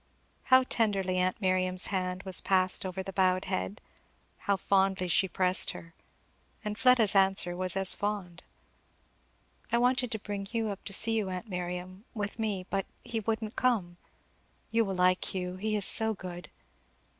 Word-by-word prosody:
How 260 0 +5
tenderly 195 -7 0
aunt 185 0 0
Miriam's 185 -2 +1
hand 185 0 -2
was 190 -2 +3
passed 185 0 +2
over 190 +1 -5
the 195 - -8
bowed 185 -1 +1
head, 95 +2 -4 0.5
how 200 -1 -1
fondly 190 -1 +1
she 185 +3 +3
pressed 185 0 +1
her. 165 0 -12 0.7
And 210 0 -3
Fleda's 240 -3 +4
answer 190 -2 +3
was 185 0 -1
as 190 -1 +6
fond. 200 -4 -4 1.3
"I 235 - +2
wanted 250 0 +1
to - - -2
bring 200 -2 -6
Hugh 225 0 -2
up 200 -1 -7
to - - -6
see 225 +3 +3
you, 210 -4 -1
aunt 185 +4 -6
Miriam, 180 +2 -6
with 210 +1 -5
me, 205 -4 -3
but 195 -1 -2 0.2
he 225 -1 -4
couldn't 220 0 -3
come. 200 -9 0 0.7
You 225 0 +2
will 195 -1 -4
like 180 +1 +1
Hugh. 180 0 -4
He 215 +2 -2
is 205 -2 +4
so 220 -1 +6
good!" 180 -2 -9
190 Hz, 165 wpm, -29 LUFS, 185-215 Hz, 1.3 s, as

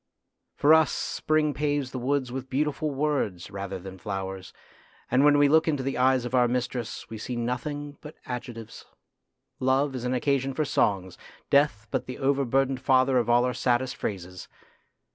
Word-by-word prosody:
For 150 +2 +5
us 160 -1 +5
Spring 155 -1 0
paves 145 -3 -1
the 130 - -4
woods 130 0 -1
with 130 0 -6
beautiful 150 +3 -1
words 135 - -2
rather 100 0 -5
than 95 +1 -10
flowers, 95 -2 -5 0.6
and 130 +3 +4
when 145 0 +6
we 145 0 +5
look 160 +3 +4
into 145 -4 0
the 135 +1 -2
eyes 130 -1 +3
of 120 - -5
our 125 -1 +4
mistress 120 -1 -3
we 110 - -6
see 125 +3 -4
nothing 145 +5 -4
but 150 +1 -10
adjectives. 120 -3 -7 0.7
Love 135 +2 +2
is 125 -2 -5
an 125 +1 0
occasion 135 +1 0
for 155 - 0
songs; 95 -8 0 0.3
Death 140 -7 +3
but - - -2
the 125 - -6
overburdened 135 -1 +1
father 130 -1 +3
of 120 - -1
all 120 +1 +4
our 125 - -1
saddest 125 +1 0
phrases. 90 -2 -5
130 Hz, 170 wpm, -26 LUFS, 120-140 Hz, 0.7 s, when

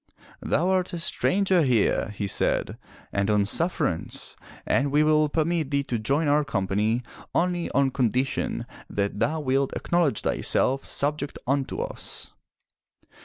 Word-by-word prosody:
*Thou 170 +5 +1
art 185 -1 +1
a 175 - -3
stranger 190 +2 +2
here/' 125 -9 +2
he 105 0 -4
said, 100 - 0 0.3
"and 100 +1 +1
on 105 -1 +3
sufferance, 160 - -1 0.3
and 140 +1 +1
we 150 +1 +4
will 155 0 +3
permit 160 -1 0
thee 140 -1 +1
to 120 -4 -2
join 140 +8 +1
our 150 +1 +3
company 105 -1 0 0.3
only 175 0 +1
on 140 -1 +2
condition 130 +1 0 0.2
that 100 0 -2
thou 155 +8 +1
wilt 135 -1 +1
acknowledge 170 -9 +1
thyself 135 +1 0
subject 145 0 -1
unto 135 +1 -1
us.' - - -6
140 Hz, 135 wpm, -26 LUFS, 115-160 Hz, 0.3 s, we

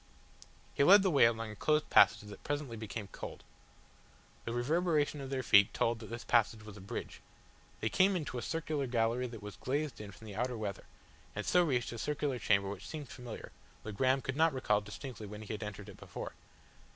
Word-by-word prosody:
He - - +3
led 195 +6 +8
the 190 - +3
way 140 -6 +6
along 115 -1 0
a - - -9
closed 150 +6 +1
passage 100 +1 +6
that 100 - -11
presently 145 -5 -3
became 110 -1 -6
cold. - - -8 1.0
The 115 - -3
reverberation 150 +3 +1
of 135 - -6
their 135 -1 -2
feet 100 -3 +6
told 115 -1 +1
that 110 - -9
this 115 +1 -6
passage 115 -2 +2
was 105 -1 -10
a 100 - -10
bridge. 95 - -6 0.6
They 110 - +1
came 190 - +4
into 145 -7 -3
a - - -5
circular 155 0 -2
gallery 120 +1 +1
that 115 -3 -9
was 105 -2 -8
glazed 145 -1 -2
in 105 - -8
from 110 - -14
the 105 -2 -8
outer 125 +2 -1
weather, 105 -3 -4 0.5
and 105 - -3
so 180 0 +4
reached 130 -7 0
a 115 - -6
circular 145 -2 -1
chamber 100 -2 +2
which 100 0 -6
seemed 150 -5 -6
familiar, 125 -3 -8 0.3
though 110 - -5
Graham 130 +5 +2
could 135 - -3
not 160 0 +4
recall 105 -6 +1
distinctly 105 +2 -8
when 105 +1 -8
he 110 - -5
had 105 - -5
entered 105 -1 -6
it 100 - -11
before. - - -7
120 Hz, 210 wpm, -33 LUFS, 105-145 Hz, 1.0 s, led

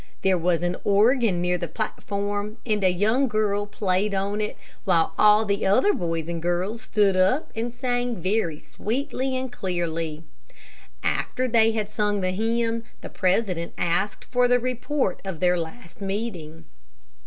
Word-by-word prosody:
There 190 -1 +4
was 175 0 +1
an 175 0 0
organ 210 -2 +3
near 180 0 +1
the 170 - -3
platform, 205 +3 -3
and 210 -3 0
a 185 - +5
young 220 +9 +2
girl 205 -2 0
played 200 0 0
on 200 +2 -1
it, 210 - -3 0.3
while 170 -5 +2
all 210 +1 +5
the 200 -1 0
other 300 - +4
boys 165 - -2
and 170 -1 -3
girls 180 +7 -1
stood 205 -5 +2
up, 190 +11 +2
and 230 +2 -2
sang 245 -1 -1
very 185 -3 0
sweetly 260 +2 -3
and 260 -1 -4
clearly. 165 -7 -3 0.8
After 255 0 0
they 225 -2 +4
had 215 -1 -2
sung 210 -1 0
the 185 0 0
hymn, 230 +3 0 0.2
the - - -7
president 185 -3 0
asked 175 +4 -1
for 250 -1 +2
the 245 0 +4
report 255 -2 -1
of 190 -5 -5
their 180 0 +3
last 170 +4 -8
meeting. 190 -6 -4
205 Hz, 155 wpm, -25 LUFS, 180-230 Hz, 0.8 s, a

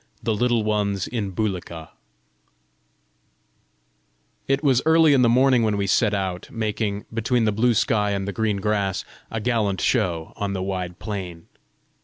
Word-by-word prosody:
THE 115 - 0
LITTLE 120 +1 +1
ONES 105 -3 0
IN 110 -5 -3
BULIKA 90 -5 -4 2.6
It 135 +2 +1
was 130 -4 +3
early 160 -1 +5
in 135 - +4
the 120 - +4
morning 130 +1 +4
when 110 -2 +1
we 100 - 0
set 105 +2 +2
out, 95 -2 -3
making, 105 -2 -3
between 115 +1 +1
the 105 - +2
blue 115 +3 +2
sky 105 -1 +1
and 100 -1 -2
the 100 - -3
green 105 +1 0
grass, 100 -2 -1 0.2
a 115 - -3
gallant 110 -4 0
show 85 -9 0
on 100 -1 -3
the 95 -1 -3
wide 90 -2 -4
plain. 90 -6 -6
105 Hz, 155 wpm, -23 LUFS, 95-115 Hz, 2.6 s, early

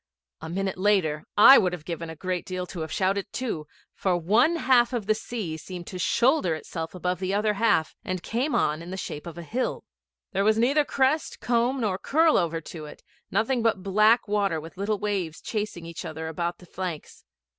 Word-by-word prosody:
A 160 - -6
minute 190 +1 -2
later 185 -7 +2
I 265 +6 +10
would 180 -4 +1
have 165 -4 -7
given 165 -1 -5
a 160 - -7
great 180 +3 -3
deal 185 -1 -4
to 180 - -8
have 160 0 -4
shouted 195 +1 0
too, 195 -12 -3 0.3
for 185 -2 0
one 220 - +3
half 255 -5 +3
of 235 -5 -2
the 215 - +3
sea 215 -7 -5
seemed 175 +1 -8
to 185 - -7
shoulder 235 - +2
itself 160 +1 -6
above 180 0 -2
the 190 +1 -1
other 210 +1 +2
half, 205 -6 +2
and 185 -1 -4
came 255 +6 -1
on 155 +2 +1
in 170 - -9
the 190 - -5
shape 150 -3 -6
of 170 - -8
a 170 - -6
hill. 245 - -2 0.5
There 195 -1 +1
was 215 +1 +3
neither 280 +6 +3
crest, 275 +4 0
comb, 245 +2 +1
nor 195 -4 0
curl 320 +2 +3
over 165 -2 +1
to 155 -1 -8
it; - - -13 0.3
nothing 225 +5 +1
but 220 -5 +1
black 215 +5 +4
water 200 -5 +1
with 165 +3 -10
little 205 +3 -1
waves 195 -6 -2
chasing 210 -6 -4
each 170 0 -7
other 160 0 -5
about 170 +2 -3
the 180 - -15
flanks. 175 -3 -6
190 Hz, 205 wpm, -26 LUFS, 170-225 Hz, 0.5 s, I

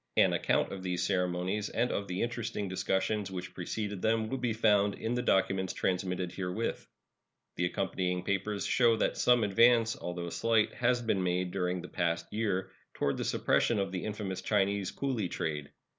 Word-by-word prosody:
An - - +5
account - - +1
of 95 - -6
these 90 -1 -1
ceremonies 90 +2 0
and 120 +2 0
of 100 - -2
the 90 +1 -2
interesting 115 -4 -3
discussions 95 +2 -1
which 90 -1 -6
preceded 100 +2 -4
them 110 0 +1
will 135 - -2
be 125 -2 0
found 105 -2 +3
in 115 +2 -3
the 125 - 0
documents 95 -4 +1
transmitted 90 -1 -1
herewith. 95 +5 -3 0.7
The 90 - 0
accompanying 90 0 -1
papers 100 +2 -1
show 120 -2 +4
that - - +1
some 120 -2 +4
advance, 115 +2 +4
although 90 -1 -5
slight, 115 -2 +2
has 120 0 +1
been 105 -4 +1
made 90 0 0
during 90 -1 -1
the - - -7
past 85 -2 -1
year 100 -4 -1 0.2
toward 70 - 0
the - - -2
suppression 115 - +2
of 100 -2 -1
the 90 -1 -3
infamous 100 -3 -4
Chinese 100 -1 +1
cooly 125 -9 -2
trade. 75 -3 -3
95 Hz, 175 wpm, -31 LUFS, 90-110 Hz, 0.7 s, An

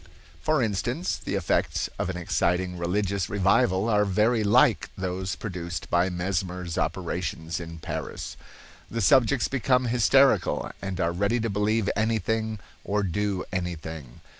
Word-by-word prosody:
For 155 -4 +2
instance, 120 - -1
the 100 - -3
effects 95 -4 0
of - - -1
an 90 - -3
exciting 90 +1 0
religious 95 +2 -1
revival 100 +1 +2
are 105 -2 +3
very 105 +3 +2
like 105 0 +4
those 95 0 -3
produced 85 -5 -5
by 85 +2 +3
Mesmer's 90 -1 -2
operations 80 +3 -2
in 85 -1 -7
Paris. 80 - -5 0.5
The 115 - -3
subjects 130 +3 +4
become 130 -1 +1
hysterical, 125 +3 +3
and 95 -1 -4
are 85 -2 +1
ready 100 +7 +1
to 115 -1 -1
believe 105 +1 +1
anything 110 0 0 0.3
or 105 0 0
do 100 +1 -1
anything. 80 -7 -5
100 Hz, 135 wpm, -26 LUFS, 90-110 Hz, 0.5 s, like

